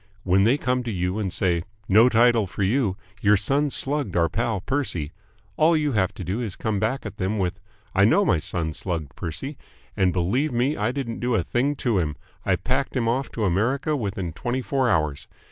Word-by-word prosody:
When 95 +2 +3
they 125 +5 +4
come 125 -2 0
to 120 -2 -4
you 90 +1 -1
and 100 -4 -2
say 90 -2 +1 0.3
"No 110 +5 +6
title 115 -2 +4
for 100 - -3
you. 100 -2 +1 0.2
Your 105 0 +5
son 140 +9 +1
slugged 135 -8 -1
our 85 -1 +3
pal 115 -2 -1
Percy," 95 - -2 0.5
all 160 +1 +4
you 150 -1 0
have 100 -6 +1
to - - -6
do 95 +7 -2
is 110 -6 -3
to - - -12
come 110 -3 -1
back 110 +6 -1
at 105 0 -7
them 95 +4 -1
with 95 0 -1 0.3
"I 100 - +4
know 110 - +4
my 90 -6 +3
son 80 0 -2
slugged 80 -6 -4
Percy, 95 - -5 0.4
and 95 -1 +3
believe 115 - 0
me 125 +5 +1
I 105 +3 0
didn't 125 -4 -4
do 120 -1 0
a 95 - +1
thing 135 - 0
to 115 -6 +3
him! 75 -4 -1 0.3
I - - +2
packed 135 +2 -2
him 120 -3 +1
off 130 +4 0
to 110 - -1
America 130 - +1
within 100 - -3
twenty 125 +8 -2
four 130 +3 +1
hours. 75 -6 0
110 Hz, 215 wpm, -24 LUFS, 95-130 Hz, 0.5 s, No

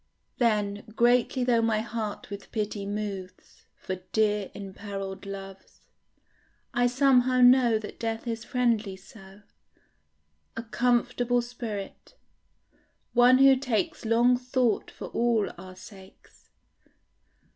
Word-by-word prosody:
Then, 210 -4 +1
greatly 245 +2 +3
though 240 -2 +3
my 225 -1 +1
heart 220 -3 -5
with 200 -1 -8
pity 210 -2 -3
moves 200 -3 -7
For 185 - -5 0.2
dear 210 -2 +1
imperilled 195 0 -7
loves, 195 -1 -10 0.9
I 245 -1 +3
somehow 255 -1 +3
know 245 -2 +6
That 215 -1 -9
death 225 0 -3
is 230 -1 -4
friendly 235 -5 0
so, 195 +1 -16 1.1
A 230 - -3
comfortable 245 +1 +1
spirit; 235 - -7 1.0
one 245 +1 +6
who 270 0 +7
takes 275 +5 -2
Long 235 +2 +3
thought 250 -3 0
for - - -9
all 230 -3 +1
our 185 +1 -11
sakes. 190 0 -16
225 Hz, 110 wpm, -27 LUFS, 200-245 Hz, 1.1 s, who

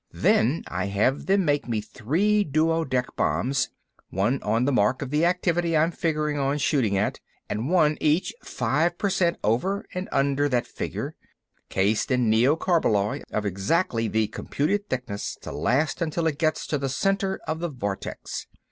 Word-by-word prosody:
Then 130 +9 +2
I 90 +2 -2
have 105 +7 0
them 195 -1 +3
make 145 -3 +1
me 115 -3 0
three 165 - +1
duodec 155 -5 0
bombs—one 120 - -1
on 115 +4 +1
the 140 - +2
mark 125 +3 +2
of 130 - -7
the 150 +3 +3
activity 175 -2 +1
I'm 160 +3 +3
figuring 150 -3 -1
on 140 +1 +1
shooting 130 -8 +1
at, 100 - 0 0.3
and 110 +7 -2
one 155 -4 +3
each 155 +4 +2
five 175 +2 0
percent 185 -4 +1
over 185 - 0
and 180 +1 -4
under 140 +1 +2
that 125 -2 +1
figure—cased 100 +3 -3
in 125 -4 +2
neocarballoy 120 - +2
of 105 - -2
exactly 115 - 0
the 110 0 +1
computed 190 - -2
thickness 125 -6 -3
to - - -7
last 145 +8 0
until 165 0 -1
it 150 -3 0
gets 155 -1 +1
to 150 - -1
the 135 0 -2
center 195 +6 0
of 160 - -2
the 175 0 -2
vortex. 100 -8 -5
145 Hz, 155 wpm, -25 LUFS, 115-165 Hz, 0.3 s, them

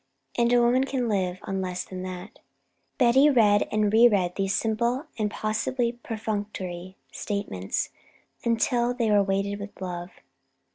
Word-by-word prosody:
And 235 0 +2
a 245 - +5
woman 245 +2 +3
can 260 -3 -1
live 185 -4 0
on 195 -1 -3
less 180 -1 -3
than 185 -1 -7
that. 185 +3 -8 0.6
Betty 265 +3 +5
read 210 -6 +4
and 215 -1 +1
re 230 +2 +8
read 185 -6 +1
these 195 -1 0
simple 235 +5 0
and 210 -1 +1
possibly 235 +4 -1
perfunctory 205 -6 -5
statements 100 - -3 0.5
until 240 +1 +1
they 230 -3 +1
were 205 -1 +5
weighted 200 +1 -1
with 200 0 -9
love. 175 -1 -5
210 Hz, 145 wpm, -26 LUFS, 190-235 Hz, 0.6 s, re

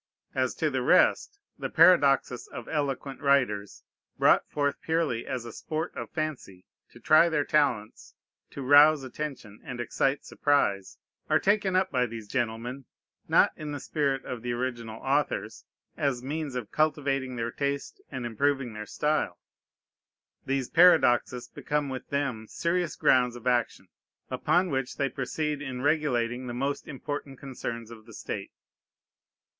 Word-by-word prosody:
As - - 0
to - - 0
the - - -1
rest, 405 - +3 0.2
the - - -3
paradoxes 145 -7 +4
of 120 - -9
eloquent 140 -3 -3
writers, 125 -8 +1 0.3
brought - - +4
forth 145 -1 -1
purely 160 -8 -1
as 125 -3 -4
a 115 - -8
sport 160 +2 -4
of - - -6
fancy, 150 - -5 0.2
to - - -16
try 155 +2 +5
their 150 -3 +1
talents, 130 -8 0 0.3
to 140 - -7
rouse 145 +2 +6
attention, 130 -6 -6
and 125 -1 -7
excite 135 +4 0
surprise, 100 -10 0 0.3
are - - +5
taken 200 -2 +1
up 190 0 +2
by 125 -2 +1
these 115 -2 -8
gentlemen, 120 +2 -3 0.4
not - - +5
in 150 -1 -6
the 145 - -4
spirit 140 -2 -1
of 125 -2 -5
the 120 0 -2
original 120 -3 -4
authors, 140 +2 -1 0.3
as 130 -4 -1
means 145 0 -4
of 125 -4 -5
cultivating 140 -4 0
their 115 0 -2
taste 140 +1 -3
and 130 -2 -5
improving 130 +1 0
their 105 -1 -7
style: 150 -12 -1 1.1
these 135 -2 0
paradoxes 125 -8 +4
become 145 +3 -2
with 130 -1 -6
them 135 -6 -2
serious 170 +3 -1
grounds 125 -1 +3
of 120 - -11
action, 120 -2 0 0.4
upon 180 -1 +1
which 135 -2 -2
they 140 -1 0
proceed 150 +3 -3
in 130 -3 -5
regulating 130 -5 0
the 120 - -5
most 140 +3 -2
important 140 -1 -6
concerns 120 -4 -6
of 110 -1 -13
the 115 - -13
state. - - -6
135 Hz, 150 wpm, -28 LUFS, 120-150 Hz, 1.1 s, rouse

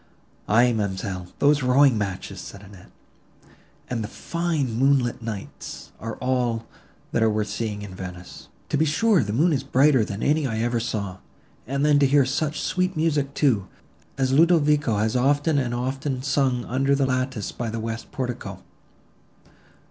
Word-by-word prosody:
"Aye, 120 +3 +4
ma'amselle, 95 -3 -3
those 145 +1 +3
rowing 130 0 +5
matches," 100 -3 -4
said 100 0 -10
Annette, 95 -2 -14 1.0
"and 115 -3 -2
the - - -4
fine 160 0 -2
moonlight 130 0 +2
nights, 110 -4 -7
are 115 -1 -5
all, 125 -3 -1 0.5
that - - 0
are 110 - +4
worth 105 0 -1
seeing 105 -3 -3
in 100 -2 -8
Venice. 90 -1 -9 0.2
To - - +1
be 155 - +3
sure 195 +5 +3
the 105 - -3
moon 155 +10 +3
is 135 - -1
brighter 135 -2 +4
than 100 0 -5
any 150 0 +2
I 110 -3 -3
ever 120 +1 0
saw; 100 -5 -3 0.5
and 140 +3 0
then 145 -1 +5
to 140 - +4
hear 140 0 +4
such 145 +3 -1
sweet 185 -1 -1
music, 145 -3 0
too, 110 -10 +2 0.5
as 130 -1 +1
Ludovico 150 -6 +4
has 110 +3 0
often 145 +4 +2
and 125 -3 -1
often 130 +2 -2
sung 135 -3 +1
under 135 +3 +1
the 140 -1 +2
lattice 130 -4 -2
by 120 -2 -4
the 115 +1 -4
west 115 +1 -5
portico! 125 -2 -5
125 Hz, 165 wpm, -24 LUFS, 110-145 Hz, 1.0 s, rowing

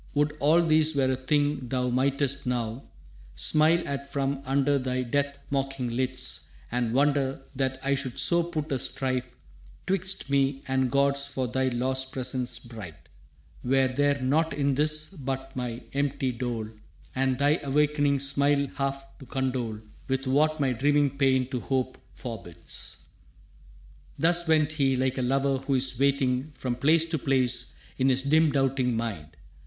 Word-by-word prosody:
Would 150 +1 +1
all 160 +4 +4
this 155 -1 +3
were 130 -2 +2
a - - +1
thing 145 +1 0
thou 125 0 0
mightest 140 +2 0
now 120 0 -2 0.5
Smile 160 +3 +3
at 140 0 -5
from 135 -1 -1
under 140 +1 +2
thy 130 0 -1
death 140 +3 -1
mocking 135 -3 -1
lids 130 0 -3 0.2
And 120 -1 0
wonder 140 0 +1
that 130 0 -1
I 140 +1 +1
should 130 -3 -3
so 170 0 +3
put 160 -3 -4
a 135 - 0
strife 130 -1 -1 0.5
Twixt 190 -1 0
me 135 -1 +1
and 130 -1 +1
gods 140 +1 +2
for 130 -2 -2
thy 130 +2 0
lost 130 +1 -1
presence 125 -2 -2
bright; 110 -8 -9 0.7
Were 130 +1 +3
there 140 +2 +1
nought 150 +5 +1
in 140 -1 +1
this 155 +2 +1
but 135 -4 -5
my 125 -1 -4
empty 140 -2 0
dole 120 -3 -4 0.4
And 130 -1 +1
thy 145 +3 +3
awakening 145 0 +2
smile 140 +1 +2
half 135 -1 -2
to 135 - -12
condole 125 -5 -2 0.3
With 135 0 -1
what 155 +4 +2
my 135 -2 +2
dreaming 145 +3 +2
pain 130 -2 +2
to 125 - -1
hope 130 0 -2 0.2
forbids». 85 - -6 1.1
Thus 170 +1 +3
went 155 -1 +3
he, 140 -4 +1
like 130 +1 0
a - - 0
lover 135 +2 +1
who 135 +1 -1
is 130 -1 0
waiting, 135 0 +1
From 125 -2 -3
place 155 +6 +4
to 160 - 0
place 125 -2 +1 0.2
in 130 +1 +3
his 130 0 +1
dim 155 +2 +4
doubting 135 -3 +1
mind. 105 -10 -5
135 Hz, 155 wpm, -27 LUFS, 130-145 Hz, 1.1 s, all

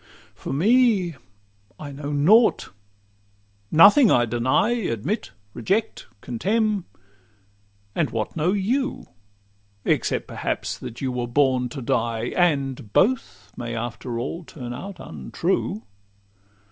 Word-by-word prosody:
For - - -7
me, 200 - +3 0.7
I 145 -2 -7
know 145 +1 -6
nought; 190 +12 +4 1.0
nothing 205 - +7
I 120 -7 +4
deny, 125 - +1
Admit, 195 - -2 0.2
reject, 200 - -1
contemn; 205 - 0 1.1
and 155 -1 0
what 110 -2 -3
know 165 +3 +1
you, 230 +8 -1 0.8
Except - - 0
perhaps - - -3
that 115 - -8
you 130 -2 -1
were 125 -1 -3
born 130 -1 +2
to 135 +1 -7
die? 115 0 -1
And 140 - 0
both 100 - +1
may 120 -1 -5
after 120 +1 -4
all 165 +8 -4
turn 125 -6 -8
out 190 +7 -8
untrue. 75 - -3
145 Hz, 110 wpm, -23 LUFS, 120-195 Hz, 1.1 s, nothing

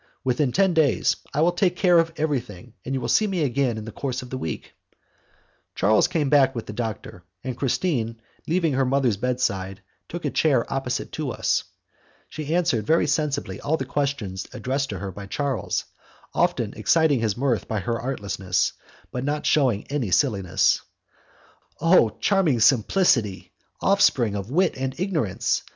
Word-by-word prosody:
"Within 130 +1 +1
ten 190 +5 +3
days. 160 -4 +3 0.2
I 150 - 0
will 170 +2 +4
take 180 0 +1
care 180 -2 +4
of 165 0 +1
everything, 125 - -3
and 135 - -3
you - - -1
will 120 - -3
see 215 - +3
me 185 -5 -1
again 130 -3 0
in 110 - -6
the 115 - -7
course 130 +2 -4
of 125 - -12
the 130 - -3
week." 80 - -5 1.0
Charles 110 +7 +3
came 165 -5 0
back 135 -2 +4
with 115 - -4
the 105 - -7
doctor, 110 -5 -5 0.2
and 130 -1 -4
Christine, 120 -4 -1 0.3
leaving 165 -2 +1
her 135 +1 +2
mother's 130 -4 +1
bedside, 100 -6 -1 0.3
took 175 +1 -6
a - - 0
chair 135 -7 +2
opposite 135 0 -2
to 155 -3 -3
us. - - 0 0.6
She 155 +1 -3
answered 160 - +1
very 165 +1 +3
sensibly 140 -11 -1
all 155 +3 0
the 135 - -4
questions 125 -9 -2
addressed 135 +2 -2
to 100 - -4
her 95 +1 -5
by 100 +2 -9
Charles, 135 -2 -2 0.5
often - - 0
exciting 160 -5 +3
his 110 -2 -1
mirth 125 -3 0
by 110 - -1
her 115 +1 -2
artlessness, 100 -7 -1 0.4
but 125 - -3
not 145 +2 -2
shewing 130 -9 +2
any 135 -8 -1
silliness. 100 -5 +2 1.0
Oh! 165 -9 +5
charming 185 - +2
simplicity! 115 - +2 0.3
offspring 135 - +3
of 100 +1 -5
wit 180 +8 +2
and 130 0 -2
of - - -17
ignorance! 120 - 0
130 Hz, 170 wpm, -24 LUFS, 110-155 Hz, 1.0 s, Oh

